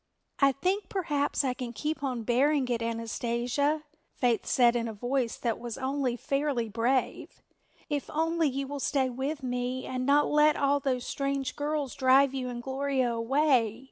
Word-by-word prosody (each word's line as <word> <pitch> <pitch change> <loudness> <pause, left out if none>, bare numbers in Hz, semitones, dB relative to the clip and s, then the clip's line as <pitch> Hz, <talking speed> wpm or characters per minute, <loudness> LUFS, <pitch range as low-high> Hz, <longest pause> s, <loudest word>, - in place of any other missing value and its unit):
"I 275 -1 +5
think 370 +7 -1
perhaps 295 -7 0
I 260 -2 0
can 250 -1 -6
keep 300 +3 -3
on 255 -4 -2
bearing 265 +4 +2
it, 235 -1 0
Anastasia," 235 +6 -1 0.3
Faith 240 -3 +1
said 240 -2 +4
in 235 -1 0
a 225 - -5
voice 245 +2 -1
that 230 -3 -2
was 235 -2 -6
only 265 -2 -1
fairly 275 -1 -1
brave, 240 +4 -1 0.4
"if 290 -2 -3
only 325 0 +1
you 275 +1 -3
will 285 +1 -5
stay 265 -1 0
with 270 +4 -3
me 250 0 -2
and 255 0 -3
not 285 +2 +4
let 300 0 +4
all 280 0 +2
those 255 -3 -1
strange 275 -1 -2
girls 295 -2 -2
drive 265 0 +4
you 255 -2 -3
and 240 -1 -6
Gloria 265 -2 0
away. 235 -2 +2
265 Hz, 170 wpm, -29 LUFS, 245-285 Hz, 0.4 s, I